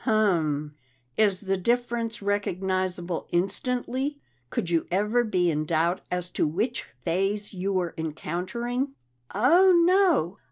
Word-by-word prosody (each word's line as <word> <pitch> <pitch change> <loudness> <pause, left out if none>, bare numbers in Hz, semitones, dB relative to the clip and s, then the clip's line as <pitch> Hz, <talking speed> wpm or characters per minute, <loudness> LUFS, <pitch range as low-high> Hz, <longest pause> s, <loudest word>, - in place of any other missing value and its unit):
"Um. 160 -9 +1 0.4
Is 205 -4 +2
the 195 -1 0
difference 235 +1 -1
recognizable 185 -3 -1
instantly? 250 +9 -1 0.3
Could 170 - -2
you 165 -1 +1
ever 210 +6 +2
be 180 -6 +1
in 155 0 -1
doubt 165 +3 +1
as 180 0 -3
to - - +1
which 215 - -2 0.2
phase 195 +5 -1
you 190 +1 -2
were 180 -3 -1
encountering?" 190 - -3 0.4
"Oh, 335 - +6
no! 345 - +3
195 Hz, 120 wpm, -26 LUFS, 175-235 Hz, 0.4 s, Oh